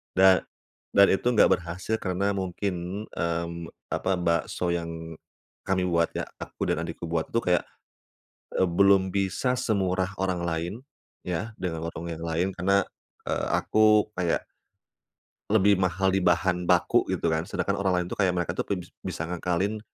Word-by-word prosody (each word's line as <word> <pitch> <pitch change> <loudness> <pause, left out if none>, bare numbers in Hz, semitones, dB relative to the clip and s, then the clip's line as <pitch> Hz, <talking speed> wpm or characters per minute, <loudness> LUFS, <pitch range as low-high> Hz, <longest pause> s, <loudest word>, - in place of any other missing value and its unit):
Dan 95 0 +7 0.6
dan 100 0 +8
itu 95 - +1
enggak 110 - +5
berhasil 90 +5 -3
karena 95 +2 0
mungkin, 95 +1 -3
mmm, 85 0 -3 0.2
apa, 95 - 0
bakso 85 +1 0
yang 85 -1 -5 0.5
kami 95 -1 +1
buat 85 -1 +2
ya, - - -2
aku - - -5
dan - - +1
adikku - - -6
buat 80 -1 -1
itu - - 0
kayak, 90 -1 +2 0.9
eee, 95 - +3
belum 95 +1 +4
bisa 100 +6 +1
semurah 95 -5 0
orang 95 -2 0
lain, 85 +2 -2 0.5
ya, 90 +6 -3
dengan 80 -3 -3
warung 85 0 -6
yang 80 0 -6
lain 85 +3 0
karena, 100 +3 +3 0.5
eee, - - -1
aku 110 -1 +4
kayak 85 -2 0 1.0
lebih 100 -2 +4
mahal 95 +1 +1
di 95 - +2
bahan 90 0 +1
baku - - +3
gitu 85 - 0
kan, 80 +2 -1
sedangkan 100 0 -1
orang 95 -2 +1
lain - - -8
itu - - -5
kayak 95 -2 +3
mereka 85 -2 -1
tuh 90 - -3
bes 90 -3 -3
bisa - - -4
ngakalin 90 +4 -1
90 Hz, 155 wpm, -27 LUFS, 85-95 Hz, 1.0 s, dan